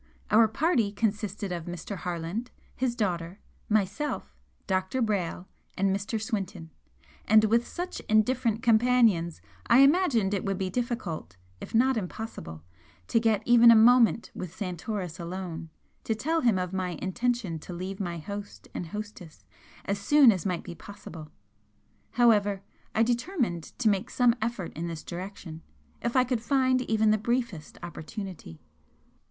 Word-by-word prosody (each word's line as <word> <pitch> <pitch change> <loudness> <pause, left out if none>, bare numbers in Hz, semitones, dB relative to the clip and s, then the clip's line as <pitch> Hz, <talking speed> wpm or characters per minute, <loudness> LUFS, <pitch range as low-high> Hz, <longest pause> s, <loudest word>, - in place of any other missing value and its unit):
Our 225 +1 +6
party 240 - +1
consisted 205 -2 -2
of 170 -2 -4
Mr. 175 +3 -6
Harland, 175 +7 -4 0.3
his 250 -2 -1
daughter, 180 -5 -2 0.3
myself, 215 +8 -1 0.3
Dr. 190 +5 -1
Brayle 195 -6 -1 0.3
and 195 0 +2
Mr. 200 +3 -3
Swinton, 195 -7 -4 0.5
and 215 0 +6
with 230 +2 +2
such 355 +1 -5
indifferent 230 +1 +2
companions 225 - +3 0.3
I 250 - +7
imagined 275 - +4
it 200 - -1
would 195 -1 -1
be 185 -1 -2
difficult, 190 - -3 0.2
if - - -7
not 255 +2 +4
impossible, 180 - -6 0.5
to - - +3
get 220 -2 +1
even 240 -1 +7
a 230 - +9
moment 230 0 +5
with 180 -1 -7
Santoris 185 -1 -4
alone, 170 -1 -5 0.4
to 225 - 0
tell 320 +8 0
him 235 -6 +3
of 180 0 -3
my 180 -3 -2
intention 220 -3 -1
to 165 - -10
leave 185 +2 -5
my 175 -3 -3
host 200 +5 -8
and 175 - -4
hostess 205 -4 -8 0.4
as 200 0 -1
soon 280 +3 +6
as 190 -3 -2
might 180 -3 -2
be - - -7
possible. 170 -4 -10 0.8
However, 205 -5 +3 0.3
I 225 - +4
determined 240 - -1
to 240 - +1
make 200 -2 +1
some 245 -2 +3
effort 220 -6 -3
in 165 +3 -3
this 165 -2 -6
direction, 175 -2 -7 0.4
if 235 +1 -2
I 255 - +6
could 250 -2 -1
find 255 0 +2
even 220 -1 +3
the 215 - +2
briefest 235 -8 -2
opportunity. 175 - -8
205 Hz, 145 wpm, -28 LUFS, 180-235 Hz, 0.8 s, a